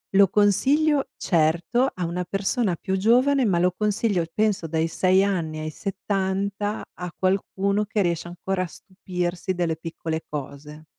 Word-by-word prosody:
Lo 195 -1 +6
consiglio 270 - +3
certo 175 +10 +1
a 180 - -3
una 175 +2 -2
persona 195 +2 0
più 190 +2 -2
giovane 255 +7 +4
ma 185 -5 +2
lo 180 +1 +2
consiglio 210 -3 +1
penso 210 -4 +1
dai 160 +1 0
6 185 +3 +3
anni 165 -6 -2
ai 155 0 -3
70 195 +3 -2
a 180 -1 -6
qualcuno 195 +2 0
che 210 0 -1
riesce 170 -2 -1
ancora 185 +2 -3
a - - -4
stupirsi 180 0 -4
delle 175 -3 -1
piccole 165 -1 -4
cose. 150 +1 -7
190 Hz, 150 wpm, -24 LUFS, 170-205 Hz, -, Lo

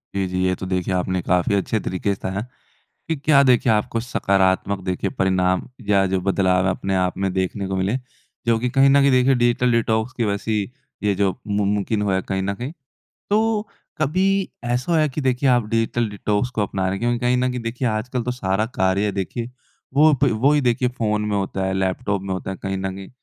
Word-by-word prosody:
जी, 100 -1 0
जी। 90 0 -3
ये 95 - +2
तो 95 - -7
देखिए 95 0 -1
आपने 90 0 0
काफ़ी 90 +3 +1
अच्छे 100 +3 0
तरीके 100 +1 -2
से 95 - -9
बताया 95 +2 -3 0.7
कि 165 - 0
क्या 140 0 +4
देखिए 125 -3 +4
आपको 110 +2 0
सकारात्मक 100 -4 +1
देखिए 95 +1 -2
परिणाम 95 -1 +1 0.2
या 100 -1 +4
जो 95 0 0
बदलाव 95 -1 +2
है - - +3
अपने 95 +1 -2
आप 90 -1 0
में 95 -1 0
देखने 95 +1 -2
को 95 - -2
मिले। 95 +5 0 0.5
जो 115 -1 +3
कि 125 +2 -1
कहीं 135 +1 +5
न 140 +1 +5
कहीं 140 0 +4
देखिए 130 +1 +4
डिजिटल 120 0 +2
डिटॉक्स 110 +1 +1
की 120 - 0
वैसी 105 +1 -1 0.4
ये 105 -1 +2
जो 100 0 +2 0.2
मुम 100 -1 0
मुमकिन 105 +1 -1
हुआ 100 -2 +1
है 95 - 0
कहीं 95 0 -1
न 100 +1 -1
कहीं। 125 +7 -6 0.6
तो 215 0 +1 0.3
कभी 190 +6 +1 0.2
ऐसा 120 +7 -1
हुआ 165 - +4
है 155 - +2
कि 145 +2 -4
देखिए 130 0 +1
आप 120 -3 +3
डिजिटल 115 0 0
डिटॉक्स 105 +3 -1
को 105 - +2
अपना 100 -1 -2
रहे 95 - +1
हैं 95 - -3
क्योंकि 120 0 +1
कहीं 125 +1 +1
न 125 +1 +1
कहीं 125 0 -4
देखिए 120 +2 -2
आजकल 115 +3 -2
तो 125 - -2
सारा 105 -3 -1
कार्य 95 +2 +2
देखिए 110 +5 -4 0.4
वो 155 +2 +6
ब 140 - +5
वो 140 +2 +5
ही 150 - +3
देखिए 125 -1 +1
फ़ोन 110 -4 -1
में 105 - 0
होता 95 -1 -2
है 95 - -1
लैपटॉप 95 +2 -1
में 95 -1 -4
होता 95 - -5
है 95 - -4
कहीं 95 0 -2
न 95 0 -3
कहीं। 95 -1 -9
105 Hz, 225 wpm, -22 LUFS, 95-125 Hz, 0.7 s, वो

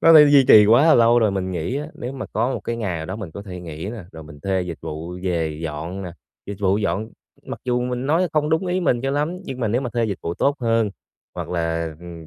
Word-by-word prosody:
nó 165 - +7
đã 155 - +11
duy 145 -2 +7
trì 105 -1 +9
quá 120 +8 +6
là 165 - +7
lâu 120 0 +5
rồi. 110 -3 +3
Mình 95 -1 -2
nghĩ 90 +9 -2
á, 150 +1 -3
nếu 125 - -6
mà 135 - -6
có 120 +4 0
một - - -4
cái 115 - -3
ngày 100 -7 -2
nào 80 0 -5
đó 95 - -5
mình 105 -6 -7
có 100 - -8
thể 90 -3 -8
nghỉ 80 0 -7
nè, 110 -5 -8
rồi 80 - -9
mình 75 -1 -13
thuê 95 +2 0
dịch 85 -2 -6
vụ 85 +4 -6
về 80 -4 -1
dọn 80 +5 -5
nè, 90 -2 -6 0.3
dịch 100 - -5
vụ 100 0 +2
dọn 105 +1 -1 0.4
mặc - - -6
dù 125 -1 +1
mình 125 +1 -2
nói 170 +5 +2
không 150 0 +1
đúng 160 +4 +1
ý 180 +1 0
mình 125 -9 +1
cho 135 +2 -1
lắm 150 +5 -1
nhưng 130 -1 -6
mà 115 - 0
nếu 120 +4 +1
mà 125 -3 -4
thuê 120 0 0
dịch 100 -5 -3
vụ 85 - -3
tốt 140 +8 +1
hơn 115 -3 +1 0.4
hoặc - - -5
là, 85 -2 -2
ừm, 85 -2 -10
105 Hz, 280 wpm, -22 LUFS, 85-125 Hz, 0.4 s, đã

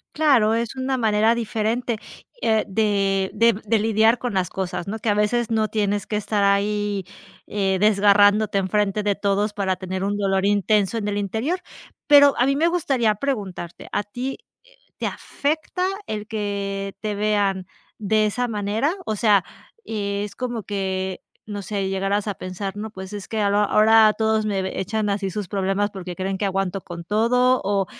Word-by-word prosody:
Claro, 265 -8 +4
es 235 +2 -2
una 260 0 -1
manera 220 -1 +3
diferente, 230 +1 -1 0.4
eh, 220 -1 +2
de 195 -2 +1
de 230 0 +4
de 220 +1 +3
lidiar 220 +2 +3
con 245 0 -3
las 185 -3 0
cosas, 185 -2 -4
¿no?, 220 +3 -4
que 225 - -3
a 205 - +3
veces 215 +3 +1
no 220 -1 +2
tienes 205 -2 -1
que - - -4
estar 210 -1 0
ahí, 205 0 +1 0.4
eh, 195 -2 0
desgarrándote 205 0 +4
enfrente 200 +2 0
de 205 -1 0
todos 205 +1 0
para 195 -2 0
tener 185 +1 -4
un 205 +1 -1
dolor 195 -1 +1
intenso 205 +1 +2
en 210 -2 -3
el 205 0 -1
interior. 220 - -1 0.5
Pero 285 -1 +7
a 245 - +4
mí 275 - +2
me 320 +4 +2
gustaría 270 -10 +1
preguntarte, 200 -9 -4
¿a 205 - -1
ti, 250 +5 -5 0.4
eh, - - -36 0.2
te - - -3
afecta 315 +5 -2 0.2
el 210 -1 -4
que 200 -2 -3
te 215 -1 -2
vean 200 -3 0 0.3
de 215 +1 +2
esa 245 +4 -1
manera?, 220 - -1
o 215 - -1
sea, 205 -3 +4 0.4
es 200 -1 -3
como 240 -3 -4
que, 190 -2 -3 0.3
no 205 -1 -5
sé, 195 0 -3
llegarás 195 +2 -1
a 205 - -1
pensar: 190 +1 -6
"No 215 +2 -5
pues 190 -1 -9
es 205 -2 -6
que 220 - -3
ahora 205 0 +2
ahora 215 +1 +6
todos 220 -1 +1
me 195 -2 -1
ve 190 - -4
echan 210 +2 -1
así 200 -1 -1
sus 200 +1 -4
problemas 195 +2 0
porque 185 -2 -7
creen 190 +1 -3
que 205 - 0
aguanto 195 0 -1
con 170 -1 -8
todo", 250 +6 +2
o, 195 0 +1
205 Hz, 180 wpm, -22 LUFS, 195-220 Hz, 0.5 s, Pero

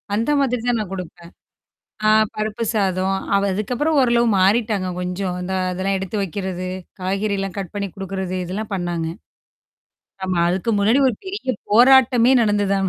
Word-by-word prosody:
அந்த 230 +7 0
மாதிரி 250 -3 +1
தான் 240 -1 +2
நான் 205 -4 -4
குடுப்பேன். 175 -2 -8 0.8
ஆ - - +6 0.3
பருப்பு 215 +2 -2
சாதம், 190 -2 +1 0.2
அ - - +6 0.2
அதுக்கப்புறம் 250 +10 -1
ஓரளவு 240 -2 +3
மாறிட்டாங்க 200 0 +2
கொஞ்சம். 180 0 -3
இந்த 190 +1 -3 0.2
அதெல்லாம் 190 +2 -1
எடுத்து 190 +2 -5
வைக்கிறது, 185 -1 -4 0.3
காய்கறல்லாம் 195 0 -2
கட் 190 -4 -5
பண்ணி 200 -1 -2
குடுக்குறது 190 -1 -4
இதெல்லாம் 200 +4 -5
பண்ணாங்க. 175 -3 -2 1.2
ஆமா. 185 -2 -1
அதுக்கு 190 +6 -1
முன்னாடி 220 +7 +3
ஒரு 235 - -2
பெரிய 380 -9 -6 0.2
போராட்டமே 250 +1 +6
நடந்து 205 -1 +1
ஆனா. 190 - 0
195 Hz, 145 wpm, -21 LUFS, 185-230 Hz, 1.2 s, ஆ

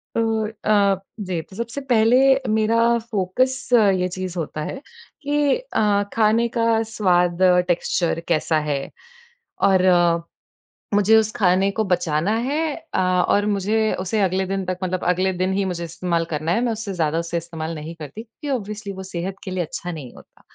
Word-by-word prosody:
तो 225 -1 +1
अ, 205 -2 +2 0.3
जी 175 -3 -1
तो 190 - -16
सबसे 235 +4 -4
पहले 225 +2 +4 0.4
मेरा 220 +1 +2 0.4
फोकस 250 +8 0 0.3
ये 180 - 0
चीज़ 185 -1 -5
होता 155 -1 -4
है - - -5 0.5
कि 290 0 +2
अ, 210 - +1
खाने 225 +1 +3
का 230 0 +2 0.2
स्वाद 180 -5 +2 0.3
टेक्सचर 170 -1 0
कैसा 160 -1 +1
है? 140 -2 -2 0.7
और 190 -2 +4 1.1
मुझे 205 +2 +5
उस 220 0 +2
खाने 190 0 +3
को - - +3
बचाना 170 +1 0 0.2
है 300 +2 0 0.3
अ, - - +1 0.3
और 205 0 +2
मुझे 215 +3 +1
उसे 190 +4 -1
अगले 190 0 +1
दिन 195 -1 -2
तक 185 0 -3
मतलब 185 0 -2
अगले 190 +1 0
दिन 185 +1 +1
ही 195 0 0
मुझे 170 -1 -4
इस्तेमाल 170 0 -2
करना 155 +2 -1
है। 210 - +2
मैं 245 -1 0
उससे 215 -2 -5
ज़्यादा 165 -2 0
उसे 170 0 -3
इस्तेमाल 165 -1 -5
नहीं 155 +2 -7
करती 160 +8 -8
क्योंकि 285 +6 -9
ऑब्वियसली 210 -2 -7
वो 190 0 -7
सेहत 180 +3 -3
के 190 - -6
लिए 185 -1 -1
अच्छा 175 +3 -6
नहीं 145 -7 -8
होता। - - -18
190 Hz, 170 wpm, -22 LUFS, 170-220 Hz, 1.1 s, मुझे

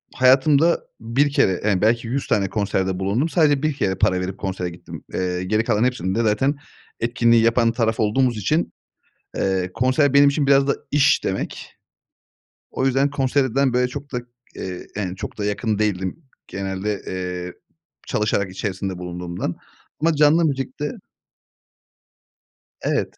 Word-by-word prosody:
hayatımda 140 +5 +4 0.2
1 125 +6 +1
kere, 95 -9 +2
yani, 100 -4 +2
belki 115 +2 +2
100 130 +4 -2
tane 100 -2 +1
konserde 95 -3 -1
bulundum. 105 +11 0
Sadece 150 -4 +2
1 155 -1 +1
kere 95 -8 -1
para 90 0 +1
verip 90 +1 -4
konsere 95 -2 -3
gittim. 85 +1 -10
Eee, 90 -1 -1
geri 110 +4 +1
kalan 115 -2 +1
hepsinde 115 -3 0
zaten 115 +7 +2 0.4
etkinliği 115 0 +3
yapan 115 0 +3
taraf 115 -1 0
olduğumuz 120 +2 +2
için, 155 - 0 0.6
eee, 95 -1 0
konser 130 +4 +2
benim 140 0 +7
için 140 0 0
biraz 140 0 +4
da - - +2
iş 145 +1 +3
demek. 95 - -4 1.0
O 130 - -1
yüzden 135 +2 +2
konserden, 135 -1 +1
böyle, 125 0 +2
çok 140 +2 -8
da, 125 - -1 0.4
eee, 90 -1 -6
yani, 95 -3 -3
çok - - -7
da 105 - -2
yakın 105 +1 -1
değildim. 95 -3 -1 0.3
Genelde, 95 +1 -3
eee, 90 -1 -4 0.5
çalışarak 100 -2 0
içerisinde 95 -1 -4
bulunduğumdan. 90 -1 -5 0.4
Ama 165 +1 +2
canlı 150 +3 +5
müzikte 145 0 -2 1.9
Evet. - - -1
115 Hz, 140 wpm, -22 LUFS, 95-135 Hz, 1.9 s, benim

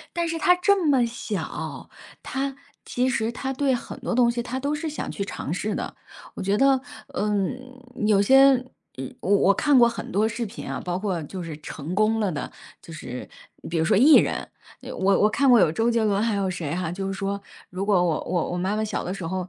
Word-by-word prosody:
但 340 -1 0
是 330 - -2
她 360 +3 +5
这 375 0 +2
么 270 -5 +4
小， 230 -4 -5 0.3
她 270 +1 -3 0.3
其 250 +1 0
实 230 -2 0
她 265 +2 -3
对 270 -1 +1
很 240 - -6
多 - - -2
东 240 -1 +4
西 240 0 -2
她 255 +2 -4
都 285 +2 -1
是 315 +2 -3
想 305 - -5
去 200 - -3
尝 165 -5 -5
试 205 +3 -2
的。 - - -4 0.4
我 - - -6
觉 200 +2 +1
得， 270 0 +4 0.3
呃， 210 -6 -1 0.7
有 205 -2 +4
些 270 +4 +6 0.6
我 195 - -3
我 200 0 +4
看 285 +4 +4
过 235 - +7
很 230 - -6
多 215 +3 +2
视 235 +1 -3
频 220 +1 -8
啊， - - -3
包 180 0 -2
括 185 -4 -2
就 180 +5 -7
是 160 -3 -6
成 155 +2 -6
功 215 +2 +2
了 205 -3 +1
的 145 - -4 0.3
就 165 - -11
是， 125 -5 -7 0.4
比 165 - 0
如 160 - +2
说 - - +3
艺 290 +8 +7
人， - - +2 0.4
我 195 +1 +1
我 210 - +5
看 275 +4 +2
过 245 -2 +7
有 155 - +4
周 225 +7 +1
杰 230 -1 +1
伦 205 -1 +1
还 225 -2 +1
有 195 -2 0
谁 170 -4 -3
哈 175 -2 -2
就 195 +1 -4
是 195 - -3
说， 200 +1 -3 0.3
如 190 +2 -4
果 190 -4 +4
我 165 -3 0
我 175 -2 -1
我 175 - -2
妈 190 +4 -1
妈 220 - 0
小 210 -3 -3
的 180 - -4
时 185 -3 -6
候 185 +1 -3
210 Hz, 245 characters per minute, -24 LUFS, 185-255 Hz, 0.7 s, 过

